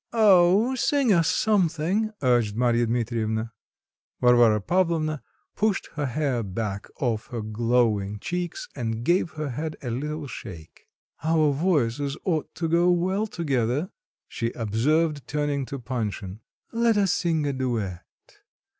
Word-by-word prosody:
"Oh! 205 +2 +5
sing 260 -2 +2
us 165 -3 +3
something," 195 +1 +1
urged 120 -5 +2
Marya 120 0 +2
Dmitrievna. 115 -1 -1 0.7
Varvara 120 -3 +5
Pavlovna 160 - 0 0.3
pushed 210 -2 0
her 150 -3 -2
hair 135 -2 -1
back 100 0 -4
off 115 -5 -1
her 115 -3 -5
glowing 110 -2 +1
cheeks 175 - -4
and 115 -3 -3
gave 175 +1 +2
her 155 -2 -4
head 155 +5 -4
a 120 - -3
little 150 +5 -3
shake. 85 - -10 0.4
"Our 155 -2 +3
voices 145 -3 0
ought 160 -5 -2
to 165 - -2
go 170 +2 +3
well 185 +4 +1
together," 145 - -1 0.4
she 115 - -2
observed, 140 +6 0
turning 145 -2 -1
to 140 - -5
Panshin; 110 -6 -4 0.3
"let 230 -1 +2
us 195 -3 +3
sing 160 -3 0
a 140 - 0
duet. 115 -9 -2
140 Hz, 130 wpm, -25 LUFS, 115-170 Hz, 0.7 s, Oh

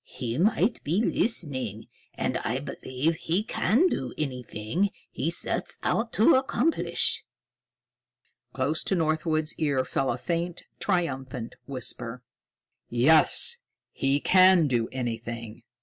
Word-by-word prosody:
He 125 0 -4
might 220 +4 +2
be 170 +7 +1
listening. 135 - 0 0.3
And - - -1
I - - -2
believe 145 +6 -2
he 175 +4 0
can 230 - +2
do 130 - -1
anything 125 - -2 0.2
he 140 +6 -1
sets 170 - -2
out 225 +1 0
to 225 +11 +5
accomplish." 265 +4 +1 1.3
Close - - 0
to 195 - +1
Northwood's 155 -1 0
ear 140 -4 +1
fell 135 - -1
a 120 - -2
faint, 170 +4 -3 0.2
triumphant 135 - -2
whisper: 125 -2 -4 0.7
"Yes, 155 - +4 0.3
he 135 +1 +1
can 185 0 +6
do 120 -5 0
anything. 115 -2 -5
155 Hz, 115 wpm, -27 LUFS, 125-185 Hz, 1.3 s, can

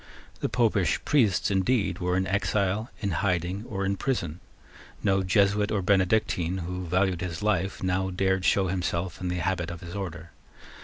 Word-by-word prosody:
The - - -1
Popish 105 -8 +2
priests, 110 -9 +3
indeed, 100 +3 +1
were 90 0 0
in 95 - +1
exile, 100 +3 0
in 100 -2 -1
hiding, 90 +2 -1
or 100 -2 -2
in 100 +1 0
prison. 90 - -2 0.6
No 95 -2 +3
Jesuit 100 +2 +2
or 100 -3 0
Benedictine 95 -2 +1
who 90 +1 -4
valued 90 0 +1
his 90 0 -4
life 100 -3 0
now 95 +1 0
dared 95 0 +1
to - - +4
show 100 - +2
himself 90 -1 -2
in 90 - -2
the 90 - -1
habit 90 -1 -1
of 85 -1 -7
his 85 +2 -8
order. 85 -4 -6
95 Hz, 170 wpm, -27 LUFS, 90-100 Hz, 0.6 s, to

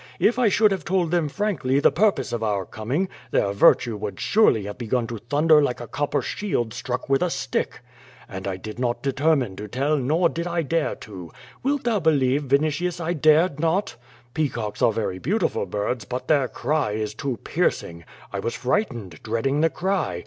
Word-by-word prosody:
If 235 +3 +3
I 240 -4 +4
should 210 +1 +4
have 190 -5 -2
told 175 -1 0
them 170 -4 +1
frankly 160 -8 0
the - - +4
pur 210 +5 +4
pose 135 -9 -6
of 120 - -2
our 105 -4 -1
coming, 130 - -2 0.2
their 100 - +1
virtue 110 +3 +4
would 100 -2 -5
surely 125 - +3
have 105 +4 -7
begun 120 0 0
to 115 -1 -6
thunder 150 +6 +4
like 125 -4 0
a 120 - -6
copper 145 0 -1
shield 120 - -2
struck 125 0 -4
with 135 0 +2
a 180 - +2
stick. 135 -5 -2 0.5
And 95 0 -6
I 95 -1 -2
did 110 +5 -8
not 120 -1 -1
determine 140 -5 +1
to 105 - -6
tell, 135 +8 0
nor 155 +7 +2
did 170 +1 -4
I 170 -1 -1
dare 165 +2 0
to! 90 -6 -9 0.3
Wilt 280 +1 0
thou 230 -3 +1
believe, 145 -4 +2
Vinitius, 155 +6 +1
I 170 +1 -1
dared 155 0 +3
not? 165 -2 0 0.4
Peacocks 135 -9 -2
are - - +5
very 100 -4 -3
beautiful 175 - 0
birds, 105 +5 -2
but 125 +4 -5
their 140 -4 +3
cry 145 -5 -1
is 105 0 -3
too 125 +2 -3
piercing. 85 0 -1 0.3
I 100 - -2
was 115 - -3
frightened, 120 - -2
dreading 115 +6 0
the 165 - +4
cry. 180 - -1
135 Hz, 190 wpm, -24 LUFS, 110-165 Hz, 0.5 s, are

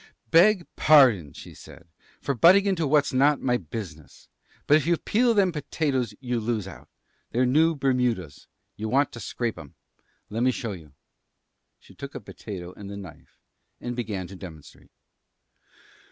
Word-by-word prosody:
"Beg 180 +2 +5
pardon," 125 - +5
she - - -12
said, 85 - -15 0.3
"for 140 - -1
butting 180 - +6
into 180 -6 0
what's 145 -1 +2
not 140 +2 +3
my 125 -2 0
business, 80 - -9 0.4
but 150 - +5
if 155 0 +1
you 170 -1 +3
peel 235 +6 +1
them 195 -3 +3
potatoes 140 -6 -2
you 125 -2 -2
lose 110 -3 -2
out. 95 - -12 0.4
They're 125 +2 +1
new 160 +6 +3
Bermudas. 125 - -1 0.3
You 110 +1 -5
want 140 +3 +2
to 120 - -9
scrape 115 -2 -4
'em. 75 -4 -13 0.5
Lemme 120 +4 0
show 115 -3 -3
you." 80 -7 -11 0.8
She - - -19
took - - -9
a - - -4
potato 90 -3 -9
and 100 -1 -10
the 100 - -7
knife, 95 -6 -13 0.4
and 120 0 -5
began 105 -6 -4
to 95 +2 -11
demonstrate. 80 -6 -13
120 Hz, 155 wpm, -25 LUFS, 100-150 Hz, 0.8 s, butting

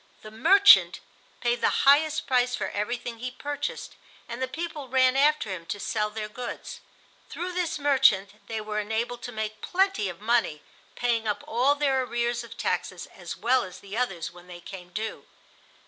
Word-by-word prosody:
The 215 - -10
"merchant" 390 - +6 0.4
paid 240 0 0
the - - +2
highest 295 +3 +4
price 250 -1 +2
for - - -3
everything 235 +2 -3
he 250 +2 -3
purchased, 290 - -5 0.3
and 235 +2 -6
the 260 - 0
people 310 -1 -5
ran 255 0 +3
after 285 -6 +3
him 170 -3 -6
to 205 - -4
sell 210 +1 -1
their 210 0 -5
goods. 240 +3 -7 0.5
Through 360 +1 -4
this 350 -3 -1
"merchant" 265 -9 +3
they 225 -1 -3
were 215 0 -3
enabled 225 +3 -2
to 245 - -6
make 215 -1 -5
plenty 380 - +1
of 175 - -9
money, 220 -9 0 0.3
paying 230 -2 0
up 205 -1 -2
all 255 +5 +3
their 275 -3 +1
arrears 240 -1 -1
of 235 - -12
taxes - - -2
as - - -7
well 255 +2 +3
as 185 -1 -9
the 200 +1 -9
others 195 -9 -2
when 175 0 -16
they 175 -1 -10
came 180 0 -10
due. 215 +4 -5
240 Hz, 180 wpm, -26 LUFS, 210-270 Hz, 0.5 s, merchant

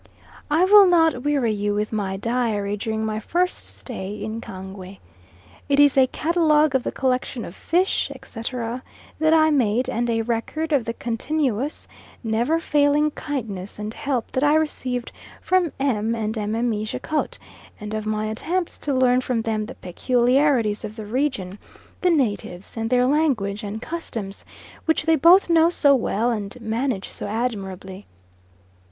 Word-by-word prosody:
I 320 +5 +4
will 405 0 +8
not 325 -7 +3
weary 275 -5 +1
you 205 0 -1
with 210 +1 -1
my 195 -3 -2
diary 215 -2 -1
during 220 +1 -2
my 215 0 -2
first 355 - -1
stay 210 -3 -6
at 220 +1 -5
Kangwe. 190 0 -9 0.7
It 280 0 +3
is 290 -2 +6
a 265 -1 +5
catalogue 310 0 +2
of 265 - +2
the - - -3
collection 255 -2 -1
of 170 - -9
fish, 360 +3 +1
etc., 235 +1 -5 0.4
that 315 0 +3
I 315 -1 +5
made, 250 -3 +1
and 240 +1 -1
a 225 -1 +1
record 240 +8 -2
of 265 -5 +2
the 230 - -2
continuous, 260 +3 -2 0.4
never 235 +8 +1
failing 295 -1 +2
kindness 215 -11 -5
and 210 +1 -5
help 270 -5 -2
that 260 - 0
I 295 +1 +4
received 255 -6 -1 0.3
from 365 -4 +1
M. 230 -5 0
and 220 0 -2
Mme. 220 +1 -1
Jacot, 300 +8 -2 0.4
and 210 0 -6
of 215 0 -3
my 215 0 -1
attempts 330 +12 -3
to 285 -2 -1
learn 255 -1 +4
from 245 -3 -1
them 215 -1 -1
the 255 - -9
peculiarities 245 - +1
of 215 0 -6
the 220 -2 -7
region, 210 -5 -2 0.4
the 365 - +3
natives, 210 - -1
and 225 0 -2
their 250 0 +3
language 255 -9 +1
and 210 +1 -5
customs, 225 -9 -6 0.4
which 320 -1 +2
they 325 0 +4
both 340 +6 +6
know 335 -1 +5
so 290 -5 +4
well 235 -2 +1
and 220 +2 -4
manage 230 -1 -2
so - - -6
admirably. 200 -4 -4
240 Hz, 160 wpm, -23 LUFS, 215-290 Hz, 0.7 s, will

